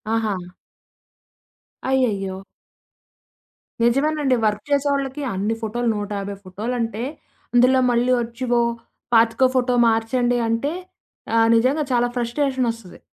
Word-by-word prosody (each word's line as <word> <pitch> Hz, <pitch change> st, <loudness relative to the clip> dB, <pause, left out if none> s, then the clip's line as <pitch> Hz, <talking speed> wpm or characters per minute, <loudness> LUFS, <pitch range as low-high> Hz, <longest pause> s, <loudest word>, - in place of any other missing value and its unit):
ఆహా! 220 Hz, -2 st, 0 dB, 1.6 s
అయ్యయ్యో! 200 Hz, -8 st, 0 dB, 1.5 s
నిజమేనండి. 275 Hz, +2 st, +2 dB
వర్క్ 210 Hz, 0 st, 0 dB
చేసే 285 Hz, 0 st, +2 dB
వాళ్ళకి 275 Hz, +1 st, -3 dB
అన్ని 205 Hz, +4 st, -1 dB
ఫోటోలు 235 Hz, +2 st, -1 dB
150 205 Hz, -1 st, -4 dB
ఫొటోలంటే 225 Hz, +4 st, -3 dB, 0.5 s
అందులో 255 Hz, +2 st, +5 dB
మళ్ళీ 240 Hz, +1 st, +2 dB
ఒచ్చి 235 Hz, +2 st, -5 dB
"ఓ -, -, +4 dB, 0.5 s
25 230 Hz, +2 st, +4 dB
ఫోటో 250 Hz, 0 st, +2 dB
మార్చండి" 240 Hz, +2 st, +1 dB
అంటే 275 Hz, +8 st, 0 dB, 0.6 s
ఆహ్, 225 Hz, 0 st, +5 dB
నిజంగా 260 Hz, +7 st, +2 dB
చాలా 245 Hz, 0 st, +2 dB
ఫ్రస్ట్రేషన్ 255 Hz, +1 st, 0 dB
ఒస్తది. 225 Hz, -6 st, -13 dB
235 Hz, 105 wpm, -22 LUFS, 225-260 Hz, 1.6 s, అందులో